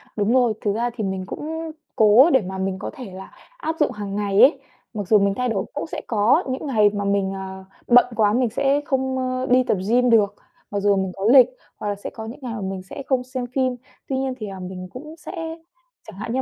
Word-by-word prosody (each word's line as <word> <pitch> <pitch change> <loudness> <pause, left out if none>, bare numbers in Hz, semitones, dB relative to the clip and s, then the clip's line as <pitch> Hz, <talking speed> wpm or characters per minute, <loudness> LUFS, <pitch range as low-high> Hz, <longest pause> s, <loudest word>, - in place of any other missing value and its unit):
Đúng 210 +2 +1
rồi, 245 -4 +4
thực 205 - 0
ra 240 +2 0
thì 220 - -3
mình 190 -1 -2
cũng 320 +7 -5 0.2
cố 220 +8 +7
để 265 - +5
mà 190 0 -6
mình 190 0 -2
có - - -4
thể 255 -10 -9
là 190 +1 -10 0.3
áp 325 -10 -3
dụng 300 - +2
hàng 205 -1 -5
ngày 205 0 +2
ấy. 270 +2 +6 0.3
Mặc 205 -4 -4
dù 215 +1 +5
mình 200 0 +2
thay 250 0 0
đổi, 195 -4 -1
cũng 290 - -4
sẽ - - -5
có 215 +1 +3
những 260 +3 -3
ngày 215 -5 +4
mà 205 -1 -2
mình, 200 -1 +1
ờ, 190 0 -7 0.2
bận 245 0 +7
quá 210 -2 +3
mình 245 0 +2
sẽ 275 +5 +1
không, 265 -1 -1
ơ, 255 0 -1
đi 255 +1 +5
tập 215 - 0
gym 250 +2 +4
được, 205 -3 +4 0.4
mặc 200 - -1
dù 200 0 +3
mình 190 -1 -1
có 195 - -4
lịch, 250 +2 +8 0.3
hoặc - - -5
là 205 - -1
sẽ 200 - -7
có 220 - -8
những 230 +4 -8
ngày 245 -3 -5
mà 220 - -5
mình 190 -1 -4
sẽ 195 +8 -8
không 260 -2 +1
xem 255 0 -4
phim. 255 -2 +1 0.3
Tuy 265 - -1
nhiên 265 -1 -1
thì, 215 - -5
ờ, 195 -1 -7
mình 185 0 -7
cũng 305 +5 -9
sẽ - - -9 0.8
chẳng 215 - -10
hạn 230 +2 -4
như 260 - +1
220 Hz, 250 wpm, -22 LUFS, 200-255 Hz, 0.8 s, lịch